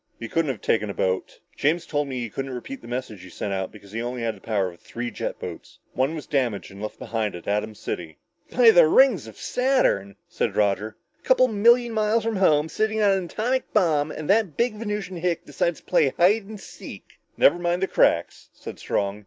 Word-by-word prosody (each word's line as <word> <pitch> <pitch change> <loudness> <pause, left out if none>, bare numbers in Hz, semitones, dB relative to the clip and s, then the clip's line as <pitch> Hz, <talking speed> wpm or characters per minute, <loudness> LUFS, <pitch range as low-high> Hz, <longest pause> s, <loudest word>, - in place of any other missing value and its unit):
"He 115 - -6
couldn't 165 +4 0
have 125 -6 -4
taken 105 -2 +1
a 100 - -5
boat. 95 0 -2 0.2
James 165 +4 +1
told 145 -1 -1
me 130 -2 -4
he 120 - -4
couldn't 135 +1 -4
repeat 265 - -7
the - - -12
message 120 -5 -5
he 95 - -11
sent 100 - -4
out 95 -1 -3
because 100 -2 -15
he 115 +2 -3
only 120 0 -4
had 115 -1 -1
the 95 - -17
power 100 -4 0
of 85 - -18
three 120 0 -6
jet - - -4
boats. - - -9 0.2
One 135 +5 0
was 155 - -6
damaged 125 -10 -1
and 100 +1 -11
left 110 - -5
behind 110 -3 -3
at 85 - -10
Atom 105 +1 -1
City!" 80 -6 -6 0.3
"By 240 -2 +6
the 170 -6 +7
rings 215 - +4
of 110 - -12
Saturn," 250 - +1
said - - -2
Roger, 105 +1 0 0.2
"a - - -38
coupla 255 0 +5
million 235 +3 +4
miles 215 +1 +1
from 225 -2 -1
home, 155 -5 +3
sitting 220 +5 -1
on 205 -2 +4
an 190 -2 0
atomic 245 +8 -2
bomb 155 -4 +2
and 155 -1 -6
that 200 -6 +2
big 235 -1 +1
Venusian 210 -4 -4
hick 170 0 -1
decides 170 -1 -1
to - - -36
play 165 -6 +3
hide 195 +5 +4
and 215 0 -9
seek!" - - -12 0.2
"Never 175 - +5
mind 175 +1 0
the - - +2
cracks," - - +1
said - - -10
Strong. 100 0 -2
150 Hz, 220 wpm, -24 LUFS, -, 0.3 s, the